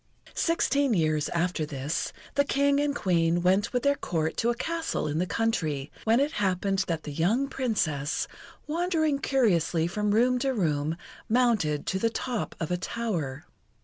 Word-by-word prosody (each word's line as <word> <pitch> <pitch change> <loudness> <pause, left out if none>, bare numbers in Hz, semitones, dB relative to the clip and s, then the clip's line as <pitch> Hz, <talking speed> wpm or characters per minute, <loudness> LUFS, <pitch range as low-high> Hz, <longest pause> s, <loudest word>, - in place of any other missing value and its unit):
Sixteen 285 -6 +2
years 155 -3 +1
after 170 -1 0
this, 145 0 -3 0.2
the 285 - +3
King 280 0 +2
and 290 0 0
Queen 170 -4 +1
went 190 +3 +3
with 250 -1 -1
their 280 - +4
Court 160 - -2
to 235 - +1
a 240 - +1
castle 325 - -2
in 150 +1 -1
the 180 - 0
country, 160 -13 -1
when 225 +2 +4
it 285 +2 +1
happened 195 -1 0
that 165 -2 -2
the 150 - -6
young 200 - +1
Princess, 160 - -1 0.4
wandering 315 -2 0
curiously 175 - +2
from 210 +5 -1
room 245 +4 +3
to 265 0 0
room, 155 -4 0 0.3
mounted 220 - +2
to 190 - -1
the 230 - +2
top 235 0 -3
of 165 +1 -3
a 180 - +1
tower. 175 - -3
200 Hz, 165 wpm, -27 LUFS, 165-255 Hz, 0.4 s, their